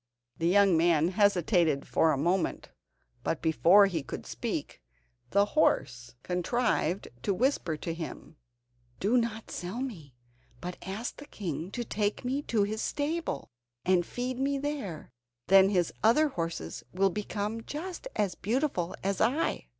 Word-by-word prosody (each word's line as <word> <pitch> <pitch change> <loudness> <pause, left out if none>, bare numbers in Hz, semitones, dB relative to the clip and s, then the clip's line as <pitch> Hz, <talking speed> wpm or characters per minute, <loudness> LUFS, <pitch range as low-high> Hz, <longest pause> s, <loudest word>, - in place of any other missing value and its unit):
The 165 - +1
young 195 0 +5
man 165 0 +4
hesitated 180 -6 +2
for 160 - +3
a 145 - +1
moment, 175 +6 0 0.5
but - - -1
before 170 +5 +6
he 175 -5 -1
could 135 - -7
speak, - - -4 0.5
the 200 +1 +4
horse 125 - +1
contrived 180 -1 0
to 200 - 0
whisper 210 - +1
to 165 +2 -4
him: 165 -1 -7 0.6
"Do 210 +6 +2
not 230 -2 -1
sell 180 +7 -4
me, 170 - -6 0.4
but 180 +5 -6
ask 200 +6 -5
the 290 - -10
king 170 -3 -4
to 240 - -2
take 210 0 -2
me 265 +3 0
to 225 -7 +1
his 215 +2 -2
stable, 300 - -2 0.3
and 180 -1 +4
feed 250 +6 -4
me 275 +1 +1
there; 270 - -4 0.4
then 195 0 +7
his 180 -4 +1
other 295 +8 +4
horses 165 - -4
will 195 +1 +2
become 210 +2 -3
just 350 - -6
as 200 -4 +1
beautiful 220 - -1
as 195 0 -1
I." 245 - +1
195 Hz, 145 wpm, -29 LUFS, 170-240 Hz, 0.6 s, then